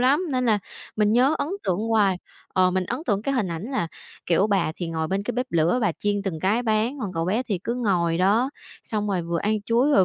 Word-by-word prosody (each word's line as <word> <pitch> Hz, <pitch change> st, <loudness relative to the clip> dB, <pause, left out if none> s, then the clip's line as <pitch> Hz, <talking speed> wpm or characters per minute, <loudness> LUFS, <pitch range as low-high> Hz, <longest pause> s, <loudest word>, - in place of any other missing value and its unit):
lắm, 285 Hz, +8 st, +3 dB
nên 255 Hz, -1 st, 0 dB
là 215 Hz, -2 st, +4 dB, 0.4 s
mình 210 Hz, 0 st, +3 dB
nhớ 260 Hz, +6 st, +4 dB
ấn 285 Hz, -, -1 dB, 0.2 s
tượng 185 Hz, 0 st, +1 dB
hoài. 205 Hz, -5 st, +3 dB, 0.4 s
Ờ, 185 Hz, 0 st, +4 dB
mình 185 Hz, 0 st, 0 dB
ấn 250 Hz, -, -4 dB
tượng 205 Hz, -3 st, +1 dB
cái 275 Hz, +4 st, -1 dB
hình 215 Hz, -7 st, 0 dB
ảnh 165 Hz, 0 st, -4 dB
là, 170 Hz, -11 st, -1 dB, 0.4 s
kiểu, 180 Hz, +4 st, +3 dB
bà 195 Hz, -6 st, +1 dB
thì 175 Hz, -2 st, -4 dB
ngồi 160 Hz, -1 st, -2 dB
bên 195 Hz, +3 st, 0 dB
cái -, -, -3 dB
bếp 250 Hz, +2 st, -1 dB
lửa, 170 Hz, +8 st, +2 dB
bà 210 Hz, -7 st, +2 dB
chiên 205 Hz, +5 st, -1 dB
từng 180 Hz, -6 st, -3 dB
cái 210 Hz, +7 st, +2 dB
bán, 225 Hz, +4 st, 0 dB
còn 200 Hz, -6 st, -3 dB
cậu 165 Hz, -1 st, -1 dB
bé 215 Hz, +8 st, +1 dB
thì 205 Hz, -7 st, -2 dB
cứ 235 Hz, -, -1 dB
ngồi 175 Hz, -8 st, +1 dB
đó, 215 Hz, +8 st, +3 dB, 0.3 s
xong 210 Hz, -2 st, -2 dB
rồi 190 Hz, -3 st, 0 dB
vừa 170 Hz, 0 st, -2 dB
ăn 210 Hz, +2 st, 0 dB
chuối 235 Hz, +7 st, +2 dB
rồi 195 Hz, -10 st, +5 dB
205 Hz, 250 wpm, -24 LUFS, 180-240 Hz, 0.4 s, rồi